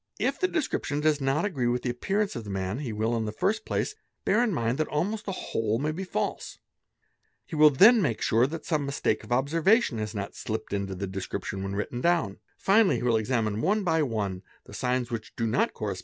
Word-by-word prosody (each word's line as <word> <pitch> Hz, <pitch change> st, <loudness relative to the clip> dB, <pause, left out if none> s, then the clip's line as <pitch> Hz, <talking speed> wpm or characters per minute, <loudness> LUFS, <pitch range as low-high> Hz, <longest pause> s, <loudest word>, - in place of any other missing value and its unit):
If -, -, 0 dB
the 370 Hz, -, +2 dB
description 280 Hz, -, -1 dB
does 150 Hz, -1 st, +2 dB
not 135 Hz, +6 st, +1 dB
agree 140 Hz, -12 st, -1 dB
with 120 Hz, +1 st, 0 dB
the 125 Hz, -, 0 dB
appearance 195 Hz, +11 st, -1 dB
of 115 Hz, -, -4 dB
the 105 Hz, -, -8 dB
man 95 Hz, +3 st, -2 dB
he 135 Hz, -6 st, -4 dB
will 110 Hz, +2 st, 0 dB
in 115 Hz, -1 st, -1 dB
the 105 Hz, -, -3 dB
first 210 Hz, -, -1 dB
place -, -, -1 dB, 0.3 s
bear 215 Hz, +4 st, +3 dB
in 240 Hz, -, +1 dB
mind 120 Hz, -4 st, -1 dB
that 155 Hz, -, +1 dB
almost 205 Hz, +8 st, -2 dB
the 195 Hz, -, -2 dB
whole 115 Hz, -, -1 dB
may 150 Hz, +5 st, -1 dB
be 180 Hz, +5 st, -4 dB
false; 145 Hz, -, -3 dB, 0.9 s
he -, -, -7 dB
will 150 Hz, 0 st, +8 dB
then 210 Hz, -, +7 dB
make 115 Hz, -, 0 dB
sure 115 Hz, +3 st, +3 dB
that 160 Hz, +3 st, -6 dB
some 155 Hz, -4 st, 0 dB
mistake 140 Hz, 0 st, -1 dB
of -, -, -13 dB
observation 155 Hz, -, +2 dB
has 110 Hz, 0 st, -4 dB
not 100 Hz, -1 st, -4 dB
slipped 110 Hz, -1 st, -5 dB
into 100 Hz, -1 st, -2 dB
the 100 Hz, +2 st, -3 dB
description 95 Hz, +1 st, -4 dB
when 95 Hz, 0 st, -3 dB
written 120 Hz, +4 st, -3 dB
down; 170 Hz, -, +1 dB, 0.2 s
finally 200 Hz, +1 st, +4 dB
he -, -, -3 dB
will 120 Hz, -2 st, +3 dB
examine 110 Hz, -2 st, 0 dB
one 205 Hz, +5 st, +1 dB
by 160 Hz, -3 st, +2 dB
one 105 Hz, -9 st, -2 dB, 0.2 s
the -, -, -13 dB
signs 125 Hz, -1 st, -1 dB
which 110 Hz, -2 st, -5 dB
do 115 Hz, -, -1 dB
not 115 Hz, +2 st, +1 dB
corres 100 Hz, -3 st, -3 dB
125 Hz, 225 wpm, -27 LUFS, 110-165 Hz, 0.9 s, will